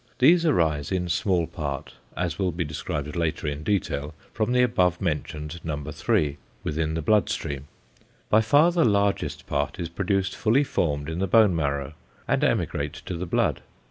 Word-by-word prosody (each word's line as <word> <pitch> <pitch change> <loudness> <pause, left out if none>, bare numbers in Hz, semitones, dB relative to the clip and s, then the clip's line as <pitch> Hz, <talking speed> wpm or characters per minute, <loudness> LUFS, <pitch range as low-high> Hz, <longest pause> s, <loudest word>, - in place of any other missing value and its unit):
These 165 +6 +5
arise 80 - +1
in 90 -2 -1
small 90 -1 +1
part, 70 -4 -5 0.2
as 85 0 -2
will 95 -2 +1
be 85 +1 -2
described 75 0 -4
later 85 -2 -1
in 75 0 -2
detail, 75 -6 -1 0.2
from 110 +2 0
the 125 0 +4
above 90 -7 +2
mentioned 75 -1 -3
No. 80 -3 -2
3, 70 +1 0 0.3
within 80 +1 -1
the 80 - -2
blood 105 +5 +3
stream. 70 0 -4 0.6
By 110 - +5
far 145 +10 +5
the 170 -1 +2
larger 100 -2 +2 0.2
part 70 +3 -2
is 85 -2 -3
produced 95 +2 -1
fully 120 +6 +3
formed 75 - -1
in 80 +1 -3
the 95 - 0
bone 105 -2 +5
marrow, 70 -2 -1 0.3
and - - +1
emigrate 75 +1 0
to 90 +1 -6
the 90 +2 -4
blood. - - +1
85 Hz, 175 wpm, -25 LUFS, 75-100 Hz, 0.6 s, These